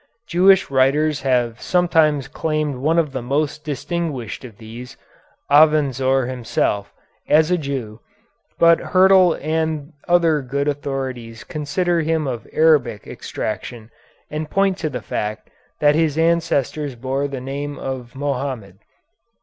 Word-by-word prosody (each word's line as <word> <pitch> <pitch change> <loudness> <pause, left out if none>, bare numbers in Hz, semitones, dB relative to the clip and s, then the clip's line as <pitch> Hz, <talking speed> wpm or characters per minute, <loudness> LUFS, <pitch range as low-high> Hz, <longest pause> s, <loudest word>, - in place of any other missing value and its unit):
Jewish 190 -3 +4
writers 140 +3 +2
have 125 -3 0
sometimes 160 -6 +2
claimed 155 -1 -2
one 155 +6 +1
of 160 -4 +1
the 130 - -4
most 150 +4 -1
distinguished 145 -5 -4
of 115 -5 -11
these, 120 +4 -10 0.5
Avenzoar 135 -4 +4
himself, 115 -5 -2 0.4
as 155 +3 +4
a 180 - +3
Jew, 130 -7 -5 0.6
but 170 0 +5
Hyrtl 185 -2 +4
and 160 -1 -2
other 170 -4 +3
good 140 +2 -2
authorities 130 -5 -4
consider 165 +5 -1
him 160 -1 0
of 125 -4 -4
Arabic 140 -10 +2
extraction 115 -2 -6 0.4
and 155 0 -4
point 195 0 +1
to 155 - -2
the 125 -5 -6
fact 105 +2 -4 0.3
that 145 0 +5
his 155 -1 +1
ancestors 155 -4 0
bore 135 +3 -2
the 135 -2 -5
name 140 +3 -5
of 130 -2 -6
Mohammed. 130 -8 -4
145 Hz, 125 wpm, -20 LUFS, 130-160 Hz, 0.6 s, but